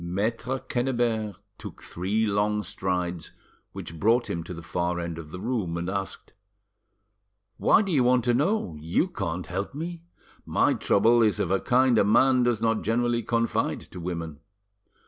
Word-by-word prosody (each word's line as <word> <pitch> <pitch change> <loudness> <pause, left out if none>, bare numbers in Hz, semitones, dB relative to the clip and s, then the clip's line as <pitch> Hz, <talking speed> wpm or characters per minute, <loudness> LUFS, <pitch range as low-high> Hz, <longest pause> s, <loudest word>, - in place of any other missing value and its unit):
Maitre 110 +8 -2
Quennebert 120 -6 -1 0.2
took - - -9
three 100 +6 -1
long 105 0 0
strides, 90 -3 -3 0.4
which 80 -1 -8
brought 115 +5 +2
him 85 0 -3
to - - -8
the 85 -1 -7
far 85 +1 -2
end 85 -1 -4
of 80 -2 -9
the 90 - -7
room, 105 -6 -2
and 85 +1 -3
asked— 95 0 -5 1.2
"Why - - +4
do 195 - -3
you 140 -6 +3
want 125 0 +3
to 120 - +3
know? 150 - 0
You 85 - +1
can't 90 - -4
help 100 +8 -4
me. 165 +2 -5 0.4
My - - +2
trouble 115 +4 +3
is 110 -2 +2
of 90 - -1
a 95 - +3
kind 125 -2 +3
a - - +5
man 125 +5 +4
does 120 -2 +1
not 115 -1 +2
generally 120 +1 +1
confide 115 +1 0
to 90 - -8
women." 85 -3 -5
105 Hz, 165 wpm, -26 LUFS, 90-120 Hz, 1.2 s, a